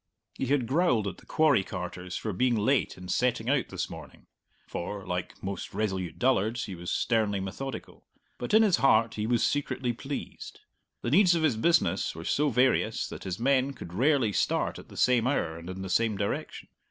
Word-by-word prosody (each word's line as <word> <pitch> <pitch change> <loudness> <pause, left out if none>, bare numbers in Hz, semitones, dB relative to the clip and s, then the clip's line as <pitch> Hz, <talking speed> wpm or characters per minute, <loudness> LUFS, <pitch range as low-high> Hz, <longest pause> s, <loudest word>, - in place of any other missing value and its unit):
He 135 - -3
had 135 -2 +2
growled 130 - +2
at 95 - -5
the - - -18
quarry 150 -10 +3
carters 90 0 -6
for 110 - -3
being 125 +5 +2
late 120 +6 +1
in 90 0 -9
setting 120 +4 +1
out 140 -3 +1
this - - -3
morning - - -11 0.4
(for, 95 +2 -5
like 90 0 -4
most 95 0 -5
resolute 95 -6 -2
dullards, 120 -2 +1
he 100 - -6
was 85 0 -6
sternly 110 -4 +1
methodical), 105 +8 -7 0.3
but 125 - 0
in 220 - +7
his 200 -5 +4
heart 115 -4 +4
he 105 0 -2
was 120 -1 +2
secretly 135 -4 -1
pleased. 135 +4 -7 0.4
The 120 - -1
needs 180 +2 +5
of 165 - 0
his 145 -7 +3
business 170 +10 +2
were - - -8
so 150 +1 +2
various 125 0 +2
that - - -8
his 95 -1 -4
men 135 +2 +2
could 85 -9 -10
rarely 125 0 +2
start - - 0
at - - -14
the - - -12
same 125 -2 +3
hour 85 - -1
and 85 +2 -9
in 95 +1 -6
the - - -4
same 110 +3 +1
direction. 100 +1 -4
115 Hz, 195 wpm, -28 LUFS, 95-135 Hz, 0.4 s, in